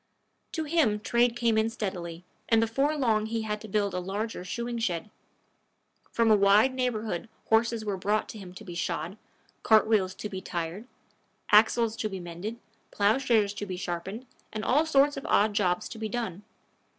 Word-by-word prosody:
To 320 - -1
him 295 -9 +2
trade 235 +2 +2
came 230 -2 +2
in 220 +1 +1
steadily, 180 -7 -5 0.3
and 225 - +5
before 270 +7 +1
long 220 -5 +1
he 225 0 -2
had 210 -1 -3
to 220 - -8
build 205 -1 0
a 180 - -1
larger 195 +2 -4
shoeing 235 +5 -4
shed. 190 -2 -2 1.0
From 230 -1 +3
a - - +8
wide 205 +5 +5
neighborhood 225 -7 -2 0.2
horses 225 0 +2
were 200 -2 -2
brought 205 +3 0
him 195 -5 -10
to 215 - -10
be 175 - -7
shod, 170 +1 -3 0.5
cart 220 -2 +5
wheels 195 -4 +1
to 210 - -5
be 190 -3 -6
tired, 175 +5 -4 0.6
axles 220 +1 +5
to 215 - -2
be 190 -2 -5
mended, 175 +7 -6 0.3
plowshares 215 -1 +2
to 205 0 -6
be 185 -1 -4
sharpened, 185 +7 -5 0.3
and 215 0 -4
all 300 +5 +3
sorts 285 -1 +3
of 275 - -6
odd 210 +1 +3
jobs 185 -4 +1
to 225 - -8
be 220 -1 -3
done. 210 -5 -3
215 Hz, 175 wpm, -28 LUFS, 190-230 Hz, 1.0 s, a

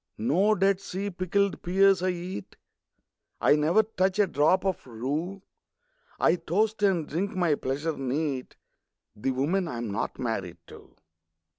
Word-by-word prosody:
No 185 - +2
Dead 195 0 +2
Sea 195 +1 -4
pickled 190 +2 0
pears 195 +1 +4
I 185 - +1
eat; 175 - -5 0.8
I 145 - +5
never 160 +8 +3
touch 190 -3 0
a 205 - +5
drop 175 +3 +2
of 190 -7 -2
rue; 150 - -4 0.8
I 165 - +4
toast, 205 +6 0
and 185 -7 +2
drink 185 +6 -2
my 175 -4 +2
pleasure 145 +3 -2
neat, 135 0 -3 0.6
The 105 +5 -2
women 155 +9 0
I'm 120 -6 -4
not 100 +2 -3
married 110 -8 -3
to! - - -15
175 Hz, 140 wpm, -27 LUFS, 140-195 Hz, 0.8 s, I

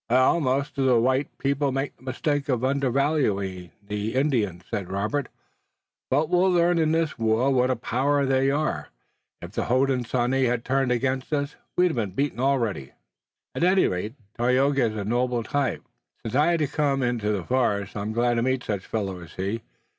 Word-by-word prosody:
"Most 135 +2 +2
of 135 - +2
the 125 -3 +4
white 130 +4 0
people 140 0 0
make 135 +2 -2
the - - -30
mistake 145 +2 -2
of 125 -2 0
undervaluing 130 - 0 0.2
the 105 +3 -3
Indians," 115 - 0
said 95 -3 -3
Robert, 105 +9 -1 0.8
"but 145 +4 +2
we'll 180 +3 +3
learn 175 -1 +3
in 155 -1 +2
this 160 -4 0
war 115 +4 +2
what 125 0 +2
a 130 - +2
power 140 +5 0
they 135 0 +2
are. 150 +2 -1 0.6
If - - -7
the - - -2
Hodenosaunee 130 0 +1
had 120 -1 -1
turned 135 -1 +1
against 130 +2 -1
us 145 -1 -1 0.2
we'd 180 0 +4
have - - -5
been 105 -4 0
beaten 140 +3 -1
already." 120 - 0 0.6
"At - - -2
any 185 +2 +4
rate, 100 +6 -3 0.2
Tayoga 130 +2 +3
is 110 - -7
a 100 -2 -3
noble 120 +1 0
type. 140 +3 -1 0.4
Since 115 - -5
I 145 +4 +4
had 170 -1 +2
to 150 - +2
come 140 -2 0
into 120 -4 0
the 100 -4 -1
forest 105 -4 0
I'm 105 +1 -3
glad 120 +2 +1
to - - +2
meet 130 0 0
such 100 -3 -4
fellows 95 -5 -3
as - - -16
he. 100 +5 -2
130 Hz, 185 wpm, -25 LUFS, 115-140 Hz, 0.8 s, the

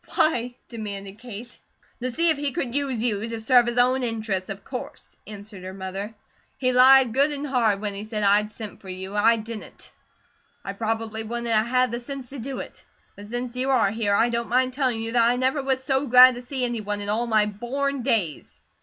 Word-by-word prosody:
"Why?" 250 -7 +1
demanded 205 -3 -7
Kate. 240 0 -10 0.4
"To 255 - -1
see 335 +7 +1
if 310 - -1
he 285 -2 -2
could 240 -2 -3
use 270 -5 -1
you 225 -1 -1
to 230 -1 -4
serve 240 +2 +4
his 240 0 -2
own 255 +2 +3
interests, 220 -6 -2
of 195 0 -7
course," 250 -2 -8
answered 205 -2 -10
her 185 +1 -7
mother. 195 +3 -6 0.4
"He 255 -1 +1
lied 255 -1 +7
good 280 +4 +3
and 290 0 -3
hard 235 -7 +1
when 205 -1 -3
he 200 +1 -6
said 215 -1 -3
I 205 +1 +4
sent 215 -1 -9
for 190 - -11
you; 190 +2 -7
I 225 +3 +4
didn't. 225 0 -8 0.7
I 195 - -4
probably 225 +1 -3
wouldn't 235 +2 -4
a 225 - +3
had 250 +3 +2
the 235 - -3
sense 265 0 -8
to 280 - -7
do 265 +3 -5
it. - - -9 0.3
But 205 0 -11
since 245 +2 -5
you 260 +2 -1
are 255 -7 +3
here, 210 -2 0
I 230 +3 +3
don't 235 0 -2
mind 255 +1 +2
telling 255 -4 0
you 225 0 -4
that 235 -1 +3
I 245 - +2
never 260 +3 0
was 265 -1 -1
so 270 0 0
glad 255 +1 +9
to 245 - -7
see 255 0 -2
any 240 -2 -2
one 205 0 -3
in 205 - -5
all 225 +3 0
my 215 -2 +3
born 260 +6 -3
days." 210 - -1
235 Hz, 220 wpm, -24 LUFS, 210-255 Hz, 0.7 s, glad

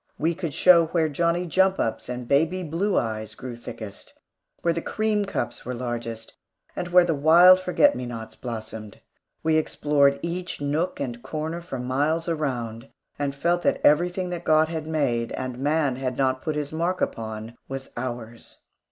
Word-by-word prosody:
We 165 +3 +1
could 165 -4 -5
show 170 -3 +6
where 160 -1 +1
Johnnie 170 +4 0
jump 190 +2 +3
ups 115 - -2
and 125 -1 -5
baby 165 +7 +2
blue 180 +5 0
eyes 110 -1 -2
grew 125 0 -7
thickest; 110 -3 -9 0.5
where 170 - +3
the 170 - -2
cream 215 +1 0
cups 195 - -4
were 125 - -4
largest; 120 -2 -5 0.4
and 175 - -3
where 180 0 +6
the 165 - +1
wild 170 +5 +7
forget 185 +11 +3
me 125 - -4
nots 115 -2 -7
blossomed. 110 -3 -7 0.4
We 160 0 +3
explored 145 -2 +2
each 175 +2 -3
nook 150 +5 -1
and 120 -3 -4
corner 155 +5 -4
for 170 -6 -6
miles 145 +7 0
around, 125 -8 -3 0.3
and 140 -1 -1
felt 175 +4 +1
that - - +1
everything 180 +4 +3
that 175 -1 -4
God 155 0 +4
had 160 -2 -4
made 125 -7 0
and 130 -1 -4
man 145 -2 +1
had 130 -1 -3
not 130 -1 +1
put 155 - -2
his 150 0 -3
mark 170 +3 -1
upon 110 0 -4
was 135 0 -6
ours. 120 -2 -6
150 Hz, 170 wpm, -25 LUFS, 125-170 Hz, 0.5 s, wild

